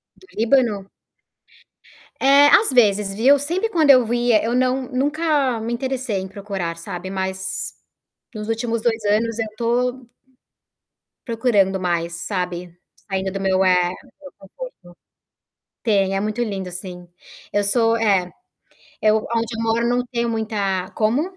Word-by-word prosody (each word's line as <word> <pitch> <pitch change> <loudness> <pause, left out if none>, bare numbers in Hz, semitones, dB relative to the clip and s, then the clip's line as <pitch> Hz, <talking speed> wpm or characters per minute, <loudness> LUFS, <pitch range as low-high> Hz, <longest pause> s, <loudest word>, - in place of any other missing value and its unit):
Do 375 - -21
Líbano? 225 -4 +1 1.3
É, 280 +2 +6
às 420 +2 +5
vezes, 210 -5 +3
viu, 260 +7 +5
sempre 355 +10 -1
quando 315 -7 +2
eu 245 -3 +4
ia 240 -3 +3
eu 235 +2 0
não 255 +1 +1
nunca 285 -2 +1
me 230 +2 -3
interessei 255 -4 -2
em 190 - -5
procurar, 195 -4 -5
sabe, 175 +2 -7
mas 190 0 -4 0.6
nos 210 0 -5
últimos 225 0 -1
2 225 -2 0
anos 220 +2 +1
eu 220 - -1
tô 245 +1 -1 1.2
procurando 215 -5 +1
mais, 170 -1 -1
sabe, 180 -3 -4 0.3
saindo 190 -1 -2
do 195 - -4
meu, 190 0 +2
eh, 180 -1 +3 0.3
meu 280 - -11
conforto. - - -10 1.1
Tem, 195 -4 +2
é - - 0
muito 215 +3 -2
lindo, 195 -5 -4
sim. 180 -1 -8 0.5
Eu 205 - +2
sou 225 +2 +2
É, 195 -5 +1 0.7
eu 215 0 +4
aonde 230 0 -1
eu - - -2
moro 230 +1 +1
não 245 0 +1
tenho 235 0 0
muita 205 -5 -2
como? 225 +7 +1
220 Hz, 140 wpm, -21 LUFS, 195-245 Hz, 1.3 s, É